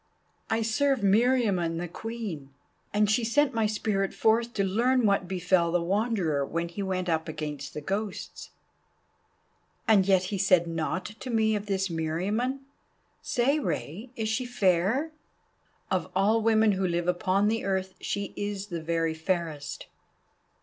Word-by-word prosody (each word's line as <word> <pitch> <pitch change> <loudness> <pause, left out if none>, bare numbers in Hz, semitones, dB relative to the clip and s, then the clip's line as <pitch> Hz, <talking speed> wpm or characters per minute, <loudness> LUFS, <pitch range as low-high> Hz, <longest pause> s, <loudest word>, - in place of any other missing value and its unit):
"I 225 0 +1
serve 265 +3 +1
Meriamun 200 -5 +3
the 175 +1 -3
Queen, 205 -8 -6 0.4
and 210 0 +3
she 215 +3 +2
sent 275 +5 +2
my 225 -2 +2
spirit 205 -2 -1
forth 230 +2 +2
to 200 - +1
learn 235 +6 +2
what 200 -3 +2
befell 180 -2 +1
the 175 - +2
Wanderer 190 -6 0
when 170 +4 -3
he 185 +4 -6
went 185 -2 -2
up 160 -1 0
against 150 -2 -5
the 150 - -4
Ghosts." 195 +5 -4 1.4
"And 200 -4 +5
yet 190 -2 +4
he 195 - -1
said 185 -3 +4
naught 165 +2 -2
to 260 - -7
me 220 -2 +2
of 205 0 -4
this 195 -1 0
Meriamun. 195 +12 -1 0.6
Say, 275 +4 +1
Rei, 215 - -4
is 220 -3 -2
she 220 +4 0
fair?" 240 - +1 0.8
"Of - - 0
all 210 +4 +3
women 220 -1 +4
who 190 -1 0
live 175 0 -1
upon 185 +3 +2
the 225 +1 0
earth 190 -1 -1
she 200 -1 -3
is 205 0 -4
the 170 -2 -4
very 165 0 0
fairest." 160 -3 -3
195 Hz, 150 wpm, -28 LUFS, 175-225 Hz, 1.4 s, And